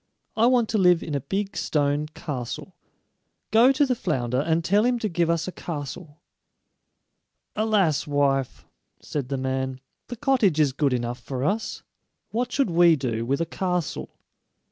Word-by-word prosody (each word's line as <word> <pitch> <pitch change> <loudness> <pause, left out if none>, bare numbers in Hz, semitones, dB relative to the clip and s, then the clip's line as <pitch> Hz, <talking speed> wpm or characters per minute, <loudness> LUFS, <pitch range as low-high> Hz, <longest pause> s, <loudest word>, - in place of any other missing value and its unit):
I 225 +2 +4
want 245 -3 +3
to 215 - +1
live 180 -2 +4
in 155 - -5
a 140 - 0
big 195 +7 -3
stone 145 0 0
castle. 145 +2 -6 0.8
Go 235 +4 +6
to 290 +2 +3
the 260 - +1
flounder, 130 - -1
and 160 +3 0
tell 205 +3 +3
him 245 0 +2
to 225 - -2
give 170 -3 0
us 170 0 0
a - - -3
castle." 150 -1 -7 1.4
"Alas, 200 -9 +1
wife!" 140 -2 0 0.3
said 140 -4 -4
the 135 - -1
man; 130 0 -2 0.3
"the 245 - -6
cottage 235 - +2
is 145 -4 +3
good 145 0 +1
enough 120 0 -2
for 130 +1 -5
us; 210 +9 -2 0.5
what 245 +2 -1
should 270 -9 +1
we 170 -1 +6
do 115 -5 -3
with 140 +4 0
a - - +1
castle?" 180 -1 -2
165 Hz, 165 wpm, -25 LUFS, 140-210 Hz, 1.4 s, Go